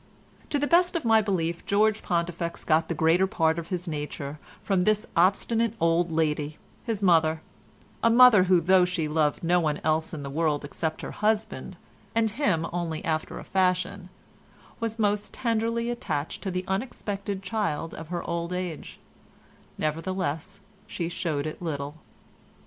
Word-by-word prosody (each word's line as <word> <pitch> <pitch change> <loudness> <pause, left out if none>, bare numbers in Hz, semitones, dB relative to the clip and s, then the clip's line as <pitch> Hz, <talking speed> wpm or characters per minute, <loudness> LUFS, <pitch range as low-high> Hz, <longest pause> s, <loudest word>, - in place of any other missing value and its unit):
To 290 - +1
the 290 - +1
best 350 +3 +3
of 330 - -1
my 225 -1 +5
belief 170 -5 -1
George 215 +1 +3
Pontifex 170 -1 -2
got 160 0 +2
the 170 - -2
greater 165 +5 +3
part 160 -2 +1
of 165 - -7
his 180 0 -4
nature 150 -1 -5 0.2
from 195 -3 +1
this 215 +3 +2
obstinate 215 +6 +2
old 165 +1 +2
lady, 150 -2 0 0.3
his 220 -4 -3
mother—a 160 +5 0
mother 230 -5 +7
who 180 -2 +4
though 185 +2 +5
she 180 -3 -1
loved 150 0 +1
no 175 +1 +3
one 155 -3 0
else 155 +1 +1
in 150 -3 -6
the 140 - -5
world 150 -1 0
except 160 +2 -4
her - - -5
husband 215 +1 -1 0.4
(and 225 -1 +2
him 205 - +1
only 165 -3 -3
after 155 -1 -2
a - - -7
fashion) 185 0 0 0.7
was 230 -1 -3
most 210 -1 0
tenderly 230 -1 0
attached 155 -10 -3
to 195 - -3
the 185 0 -3
unexpected 200 -2 -3
child 185 -6 -2
of 160 - -8
her 175 0 -3
old 170 0 -2
age; 180 -3 -5 0.8
nevertheless 165 +3 -3 0.3
she 170 -5 -3
showed 165 -5 -2
it 155 - -5
little. 145 -4 -3
175 Hz, 155 wpm, -27 LUFS, 160-205 Hz, 0.8 s, mother